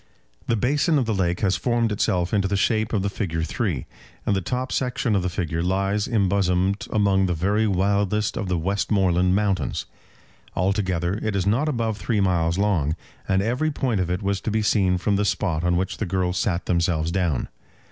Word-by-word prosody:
The 115 Hz, -, +2 dB
basin 145 Hz, -, +2 dB
of 130 Hz, -, +1 dB
the 110 Hz, -, 0 dB
lake 90 Hz, -3 st, 0 dB
has 95 Hz, -2 st, +2 dB
formed 120 Hz, -2 st, 0 dB
itself 90 Hz, -3 st, 0 dB
into 100 Hz, -2 st, +2 dB
the 100 Hz, +1 st, 0 dB
shape 110 Hz, +1 st, +1 dB
of 100 Hz, -4 st, 0 dB
the -, -, 0 dB
figure 85 Hz, -6 st, -2 dB
of -, -, -1 dB
3, 85 Hz, -, -2 dB, 0.4 s
and 100 Hz, -, +2 dB
the 95 Hz, -, 0 dB
top 125 Hz, +6 st, -3 dB
section 125 Hz, -3 st, 0 dB
of 95 Hz, -, +2 dB
the 90 Hz, -, -1 dB
figure 85 Hz, -2 st, -2 dB
lies 95 Hz, +3 st, 0 dB
embosomed 95 Hz, -2 st, +1 dB
among 100 Hz, -2 st, +2 dB
the 90 Hz, -, 0 dB
very 100 Hz, +6 st, +1 dB
wildest 100 Hz, +2 st, +1 dB
of 100 Hz, -, -3 dB
the 90 Hz, -1 st, 0 dB
Westmoreland 95 Hz, 0 st, +1 dB
mountains. 100 Hz, -7 st, 0 dB, 0.7 s
Altogether 95 Hz, -1 st, 0 dB
it 110 Hz, -2 st, -1 dB
is 95 Hz, -2 st, 0 dB
not 120 Hz, +10 st, +2 dB
above 115 Hz, -6 st, -1 dB
three 105 Hz, +4 st, 0 dB
miles 85 Hz, -3 st, +1 dB
long, 90 Hz, -7 st, +1 dB, 0.3 s
and 95 Hz, 0 st, +2 dB
every 125 Hz, +8 st, 0 dB
point 130 Hz, -9 st, -1 dB
of 90 Hz, -, -2 dB
it 90 Hz, +3 st, -2 dB
was 100 Hz, 0 st, -1 dB
to -, -, -2 dB
be 110 Hz, 0 st, 0 dB
seen 95 Hz, -3 st, +2 dB
from 100 Hz, +2 st, 0 dB
the 105 Hz, -, +1 dB
spot 90 Hz, -5 st, 0 dB
on 90 Hz, 0 st, +2 dB
which 95 Hz, +1 st, -2 dB
the 105 Hz, -, -2 dB
girls 90 Hz, 0 st, 0 dB
sat 90 Hz, -5 st, -1 dB
themselves 85 Hz, -2 st, +1 dB
down. 85 Hz, -7 st, 0 dB
95 Hz, 200 wpm, -23 LUFS, 90-105 Hz, 0.7 s, The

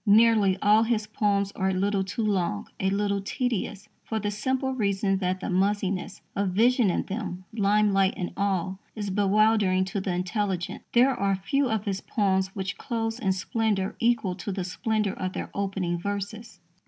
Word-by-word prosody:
Nearly 210 Hz, -2 st, +5 dB
all 210 Hz, +1 st, +6 dB
his 225 Hz, -2 st, +1 dB
poems 200 Hz, -2 st, 0 dB
are 190 Hz, -1 st, -1 dB
a -, -, 0 dB
little 195 Hz, +1 st, +1 dB
too 200 Hz, +4 st, -3 dB
long, 180 Hz, -, 0 dB
a 190 Hz, -, +1 dB
little 200 Hz, 0 st, 0 dB
tedious, 215 Hz, -2 st, -2 dB, 0.2 s
for 220 Hz, -, -3 dB
the 205 Hz, 0 st, -2 dB
simple 260 Hz, +5 st, -1 dB
reason 200 Hz, -4 st, +1 dB
that 185 Hz, 0 st, -1 dB
the -, -, -3 dB
muzziness 195 Hz, 0 st, 0 dB
of 200 Hz, -1 st, +1 dB
vision 230 Hz, +3 st, +3 dB
in -, -, 0 dB
them, 190 Hz, -3 st, -5 dB
limelight 200 Hz, -2 st, +3 dB
and 180 Hz, -, -3 dB
all, 190 Hz, -2 st, -1 dB, 0.2 s
is 205 Hz, -3 st, -3 dB
bewildering 205 Hz, -1 st, +3 dB
to 195 Hz, +1 st, -3 dB
the 185 Hz, -2 st, -2 dB
intelligence. 185 Hz, -1 st, -2 dB
There 255 Hz, +3 st, +5 dB
are 200 Hz, -4 st, +1 dB
few 255 Hz, +8 st, 0 dB
of 220 Hz, -2 st, -1 dB
his 195 Hz, -2 st, -2 dB
poems 190 Hz, -3 st, +1 dB
which 190 Hz, -1 st, -4 dB
close 225 Hz, -1 st, -2 dB
in 195 Hz, -6 st, +1 dB
splendour 200 Hz, 0 st, -1 dB
equal 230 Hz, -5 st, +2 dB
to 200 Hz, -, -4 dB
the 190 Hz, -1 st, -3 dB
splendour 210 Hz, +2 st, -1 dB
of 185 Hz, -1 st, -4 dB
their -, -, -5 dB
opening 190 Hz, -3 st, -2 dB
verses. 200 Hz, +2 st, -5 dB
200 Hz, 175 wpm, -26 LUFS, 190-215 Hz, 0.2 s, all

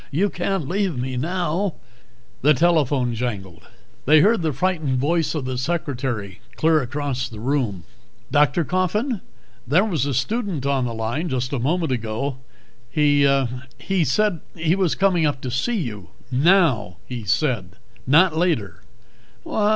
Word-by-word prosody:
You 185 Hz, +7 st, +1 dB
can't 180 Hz, -4 st, -2 dB
leave 185 Hz, -4 st, -1 dB
me 130 Hz, +1 st, -3 dB
now 175 Hz, +5 st, -1 dB, 0.3 s
" 120 Hz, 0 st, -33 dB
The 150 Hz, +2 st, +5 dB
telephone 145 Hz, -6 st, +2 dB
jangled. 95 Hz, -9 st, -5 dB, 0.4 s
They 155 Hz, +1 st, +7 dB
heard 215 Hz, +2 st, +4 dB
the 160 Hz, -2 st, 0 dB
frightened 155 Hz, -2 st, 0 dB
voice 160 Hz, +5 st, +1 dB
of 145 Hz, -4 st, -3 dB
the 130 Hz, -1 st, -3 dB
secretary 125 Hz, -, -3 dB
clear 160 Hz, -1 st, +3 dB
across 135 Hz, 0 st, -3 dB
the 110 Hz, -, -9 dB
room. 120 Hz, -, -1 dB, 0.5 s
"Dr. 150 Hz, +3 st, +3 dB
Coffin? 190 Hz, -, 0 dB, 0.5 s
There 170 Hz, -, +4 dB
was 160 Hz, -, -1 dB
a 140 Hz, -, -1 dB
student 190 Hz, -, -1 dB
on 135 Hz, -2 st, +1 dB
the 120 Hz, -, -3 dB
line 120 Hz, +10 st, -2 dB
just 130 Hz, 0 st, -2 dB
a 135 Hz, -, 0 dB
moment 160 Hz, +4 st, 0 dB
ago. 120 Hz, +3 st, -2 dB, 0.5 s
He 145 Hz, 0 st, +3 dB, 0.5 s
he 190 Hz, -3 st, 0 dB
said 180 Hz, +5 st, +1 dB, 0.2 s
he 165 Hz, +1 st, +1 dB
was 185 Hz, -4 st, +1 dB
coming 180 Hz, -5 st, +2 dB
up 145 Hz, -2 st, -2 dB
to 125 Hz, -, -4 dB
see 225 Hz, -, 0 dB
you. 105 Hz, -, -5 dB, 0.2 s
Now, 135 Hz, -, +3 dB
he 125 Hz, -3 st, -5 dB
said, 110 Hz, -, 0 dB, 0.3 s
not 165 Hz, +5 st, +5 dB
later." 115 Hz, -, 0 dB
145 Hz, 150 wpm, -22 LUFS, 125-175 Hz, 0.5 s, They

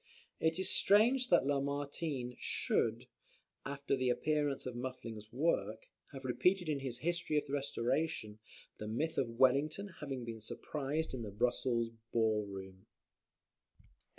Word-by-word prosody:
It 160 Hz, +1 st, +2 dB
is 190 Hz, -, 0 dB
strange 240 Hz, +6 st, +5 dB
that 170 Hz, -6 st, +5 dB
Lamartine 140 Hz, -2 st, -1 dB
should, 115 Hz, +2 st, +1 dB, 0.6 s
after 140 Hz, 0 st, -1 dB
the 130 Hz, -1 st, +1 dB
appearance 145 Hz, +2 st, 0 dB
of 125 Hz, -2 st, -4 dB
Muffling's 115 Hz, -4 st, -6 dB
work, 165 Hz, -, 0 dB, 0.3 s
have 135 Hz, -2 st, -8 dB
repeated 180 Hz, +8 st, +2 dB
in 145 Hz, -2 st, 0 dB
his 130 Hz, -3 st, -3 dB
"History 175 Hz, -3 st, +1 dB
of 150 Hz, -, +1 dB
the 140 Hz, -, -7 dB
Restoration" 135 Hz, -4 st, -1 dB, 0.4 s
the 105 Hz, -, -5 dB
myth 155 Hz, +9 st, -1 dB
of 125 Hz, -, 0 dB
Wellington 145 Hz, +9 st, +3 dB
having 135 Hz, -5 st, -4 dB
been 115 Hz, -1 st, -6 dB
surprised 150 Hz, +7 st, -3 dB
in 130 Hz, -, -3 dB
the 110 Hz, -, -4 dB
Brussels 115 Hz, +2 st, +1 dB, 0.2 s
ball 110 Hz, -2 st, +2 dB
room, 95 Hz, -1 st, -9 dB, 0.9 s
&c. -, -, -25 dB
135 Hz, 140 wpm, -35 LUFS, 115-155 Hz, 0.9 s, strange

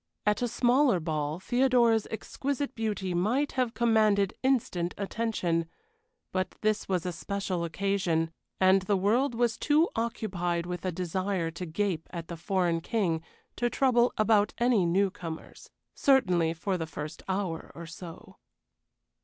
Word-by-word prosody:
At 210 Hz, +1 st, +2 dB
a 245 Hz, -, +1 dB
smaller 245 Hz, -2 st, +3 dB
ball 155 Hz, -1 st, -2 dB
Theodora's 240 Hz, -1 st, +3 dB
exquisite 280 Hz, +5 st, -3 dB
beauty 210 Hz, -5 st, -2 dB
must 235 Hz, +12 st, +1 dB
have 255 Hz, -3 st, -1 dB
commanded 215 Hz, -4 st, +3 dB
instant 220 Hz, -10 st, 0 dB
attention, 195 Hz, -6 st, -1 dB, 0.6 s
but 185 Hz, -1 st, -2 dB
this 215 Hz, -1 st, 0 dB
was 185 Hz, -3 st, 0 dB
a 180 Hz, -, -1 dB
special 185 Hz, 0 st, -3 dB
occasion, 170 Hz, -2 st, 0 dB, 0.3 s
and 190 Hz, +1 st, +5 dB
the 195 Hz, +1 st, +1 dB
world 235 Hz, +7 st, +2 dB
was 235 Hz, -1 st, +1 dB
too 305 Hz, +3 st, +3 dB
occupied 185 Hz, -7 st, -2 dB
with 180 Hz, 0 st, -5 dB
a 185 Hz, -, 0 dB
desire 180 Hz, 0 st, -2 dB
to 175 Hz, +2 st, -6 dB
gape 175 Hz, -1 st, -1 dB
at 170 Hz, -2 st, -7 dB
the 170 Hz, -, -4 dB
foreign 170 Hz, -1 st, 0 dB
king 175 Hz, -6 st, 0 dB, 0.4 s
to 240 Hz, -, +1 dB
trouble 245 Hz, -2 st, +3 dB
about 215 Hz, -1 st, +3 dB
any 235 Hz, -7 st, +3 dB
new 190 Hz, +3 st, +2 dB
comers. 165 Hz, -3 st, -8 dB, 0.2 s
Certainly 180 Hz, -12 st, +3 dB
for 185 Hz, +3 st, -2 dB
the 160 Hz, -, -3 dB
first 155 Hz, 0 st, -7 dB
hour 190 Hz, -4 st, -2 dB
or 170 Hz, -, -7 dB
so. 170 Hz, 0 st, -10 dB
195 Hz, 145 wpm, -29 LUFS, 170-230 Hz, 0.6 s, and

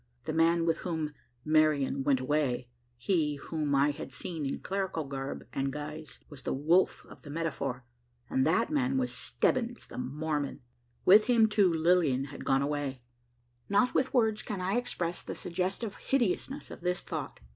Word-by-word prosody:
The -, -, -3 dB
man 165 Hz, +1 st, +3 dB
with 165 Hz, -1 st, +2 dB
whom 160 Hz, -4 st, -3 dB, 0.3 s
"Marian 150 Hz, -3 st, +3 dB
went 135 Hz, -2 st, +3 dB
away" 130 Hz, -2 st, 0 dB, 0.3 s
he 150 Hz, +1 st, +1 dB
whom 150 Hz, 0 st, -2 dB
I 140 Hz, +2 st, +4 dB
had 145 Hz, -, -8 dB
seen 150 Hz, +3 st, -4 dB
in 135 Hz, -, -2 dB
clerical 190 Hz, -4 st, -2 dB
garb 135 Hz, -1 st, -5 dB
and 135 Hz, 0 st, -1 dB
guise, 150 Hz, 0 st, -7 dB
was 145 Hz, -3 st, -11 dB
the -, -, -2 dB
wolf 165 Hz, +7 st, +2 dB
of -, -, -14 dB
the 145 Hz, -, -11 dB
metaphor; 145 Hz, -5 st, -3 dB, 0.4 s
and 130 Hz, -, +1 dB
that 185 Hz, -, +2 dB
man 270 Hz, -3 st, +1 dB
was 255 Hz, -1 st, 0 dB
Stebbins, 240 Hz, -1 st, 0 dB
the -, -, -8 dB
Mormon! 145 Hz, +2 st, -2 dB, 0.4 s
With 210 Hz, +4 st, +7 dB
him, 235 Hz, -3 st, +5 dB
too, 205 Hz, -4 st, +4 dB
Lilian 160 Hz, -5 st, +3 dB
had -, -, -8 dB
gone 135 Hz, 0 st, +3 dB
away! 140 Hz, -3 st, -2 dB, 0.7 s
Not 240 Hz, +5 st, +3 dB
with 265 Hz, -, +2 dB
words 220 Hz, -4 st, +2 dB
can 205 Hz, -3 st, -4 dB
I 185 Hz, +2 st, 0 dB
express 180 Hz, -8 st, -2 dB
the -, -, -6 dB
suggestive 190 Hz, +4 st, -3 dB
hideousness 265 Hz, +3 st, -1 dB
of -, -, -9 dB
this 180 Hz, +1 st, 0 dB
thought. -, -, -5 dB
160 Hz, 165 wpm, -30 LUFS, 140-195 Hz, 0.7 s, With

